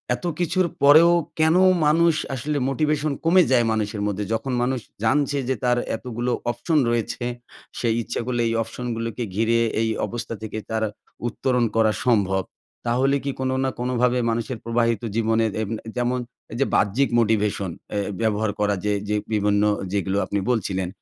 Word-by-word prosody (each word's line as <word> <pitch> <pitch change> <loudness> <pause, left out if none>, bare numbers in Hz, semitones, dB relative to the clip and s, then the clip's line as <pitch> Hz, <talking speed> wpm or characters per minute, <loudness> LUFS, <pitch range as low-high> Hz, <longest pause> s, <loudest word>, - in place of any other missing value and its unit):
এত - - -9
কিছুর 180 +1 +1 0.2
পরেও 155 +4 +8 0.3
কেন 160 +1 +4 0.3
মানুষ 165 +2 +4 0.2
আসলে 145 +4 -2
মোটিভেশন 150 +2 0
কমে 180 +3 +5
যায়। 120 -3 +4
মানুষের 105 -1 -2
মধ্যে 105 0 -2
যখন 115 +4 -2
মানুষ 130 +1 0 0.2
জানছে 145 +4 +2
যে 130 - +2
তার 125 0 +3 0.2
এতগুলো 120 +1 -3 0.2
অপশন 155 +7 -1
রয়েছে। 120 +1 -1 0.6
সেই 115 -2 +1
ইচ্ছা - - -4
করলে 120 -1 -1
এই 115 - 0
অপশনগুলোকে 115 0 -4
ঘিরে 115 +2 +2 0.2
এই 115 - +1 0.2
অবস্থা 120 -1 -5
থেকে 110 0 -5
তারা 110 -1 0 0.4
উত্তরণ 125 0 0
করা 110 -1 +4 0.2
সম্ভব। 95 -5 +2 0.4
তাহলে 130 +4 +2
কি 140 - -1
কোনো 130 0 0
না 135 - +1
কোনোভাবে 125 0 +1
মানুষের 115 +2 -2
প্রবাহিত 115 -2 +1
জীবনের 115 -1 +2
এব 105 - -3 0.2
এ - - -4
যেমন 125 +1 0 0.3
এই 115 - -5
যে 140 - +3
বাহ্যিক 115 +7 +2
মোটিভেশন 105 -4 +1 0.2
অ্যা 105 - -1 0.2
ব্যবহার 110 -1 +1
করা 105 -1 +2
যে 105 - +2 0.2
যে 105 - +1 0.2
বিভিন্ন 105 -1 +2 0.3
যেগুলো 100 -1 0
আপনি 100 - -1
বলছিলেন। 95 -5 -1
115 Hz, 160 wpm, -23 LUFS, 110-130 Hz, 0.6 s, পরেও